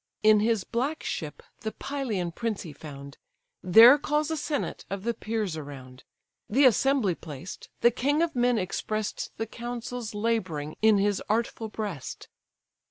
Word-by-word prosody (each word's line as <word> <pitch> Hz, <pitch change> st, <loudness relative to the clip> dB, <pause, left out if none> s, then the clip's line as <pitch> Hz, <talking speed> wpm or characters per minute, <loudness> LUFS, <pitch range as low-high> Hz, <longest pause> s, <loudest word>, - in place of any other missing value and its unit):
In 215 Hz, 0 st, +7 dB
his 220 Hz, -2 st, +1 dB
black 270 Hz, -, -2 dB
ship 150 Hz, -2 st, -5 dB, 0.2 s
the 220 Hz, -, -4 dB
Pylian 230 Hz, -11 st, -3 dB
prince 225 Hz, +3 st, -3 dB
he 160 Hz, -5 st, -9 dB
found; 140 Hz, -1 st, -10 dB, 0.4 s
There 230 Hz, +10 st, +8 dB
calls 300 Hz, +2 st, 0 dB
a -, -, 0 dB
senate 295 Hz, -1 st, -3 dB
of 195 Hz, 0 st, -4 dB
the 235 Hz, +1 st, 0 dB
peers 215 Hz, -5 st, -3 dB
around: 135 Hz, -4 st, -9 dB, 0.4 s
The 270 Hz, +6 st, +4 dB
assembly 255 Hz, -4 st, +3 dB
placed, 160 Hz, +1 st, -9 dB
the 240 Hz, -, +6 dB
king 285 Hz, +6 st, +1 dB
of 335 Hz, -4 st, -2 dB
men 245 Hz, -1 st, +3 dB
express'd 215 Hz, +2 st, -3 dB
The 225 Hz, -, -2 dB
counsels 240 Hz, 0 st, -6 dB
labouring 185 Hz, -9 st, -1 dB
in 220 Hz, -1 st, +6 dB
his 200 Hz, 0 st, +1 dB
artful 225 Hz, 0 st, -1 dB
breast. 205 Hz, -, -6 dB
220 Hz, 150 wpm, -27 LUFS, 180-245 Hz, 0.4 s, There